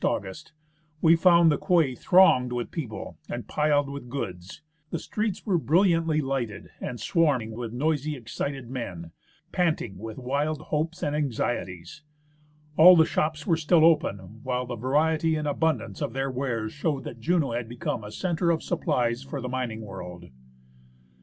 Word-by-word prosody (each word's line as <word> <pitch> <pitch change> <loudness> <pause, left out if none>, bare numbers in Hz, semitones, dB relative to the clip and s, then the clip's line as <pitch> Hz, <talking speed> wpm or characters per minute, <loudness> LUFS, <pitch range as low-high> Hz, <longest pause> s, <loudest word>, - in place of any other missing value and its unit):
ELIAS - - +4
August), 100 +13 -8 0.5
we 165 +1 +6
found 170 -1 +5
the 150 - 0
quay 165 -8 +2
thronged 125 -3 +4
with 120 -1 -3
people 125 -10 -6
and - - -5
piled 150 -1 +2
with 140 -3 -7
goods; 95 -6 -6 0.3
the 170 - -2
streets 210 +4 -3
were 190 -6 +2
brilliantly 165 - +2
lighted 135 -6 -3
and 120 - -5
swarming 130 -3 +1
with 115 0 -5
noisy, 150 +3 -1
excited 130 +1 -5
men, 100 -10 -6 0.4
panting 155 - -1
with 110 +1 -7
wild 140 +4 -1
hopes 155 +3 -3
and 145 - 0
anxieties. 120 - -3 0.8
All 180 +3 +10
the 160 -2 +6
shops 155 -1 -1
were 170 - +3
still 160 0 +4
open, 110 - +1
while 125 -1 -2
the 120 0 -5
variety 155 +6 +1
and 150 -1 -2
abundance 135 - -1
of - - -2
their 135 +1 -2
wares 120 -4 -3
showed 145 -2 -2
that 115 - -8
Juneau 160 0 +1
had 115 -1 -3
become 120 -2 -3
a 105 - -8
centre 170 - -1
of 165 -1 +1
supplies 120 0 0
for 140 +1 -6
the 125 -1 -5
mining 125 -3 -3
world. 90 -5 -9
140 Hz, 160 wpm, -26 LUFS, 115-160 Hz, 0.8 s, All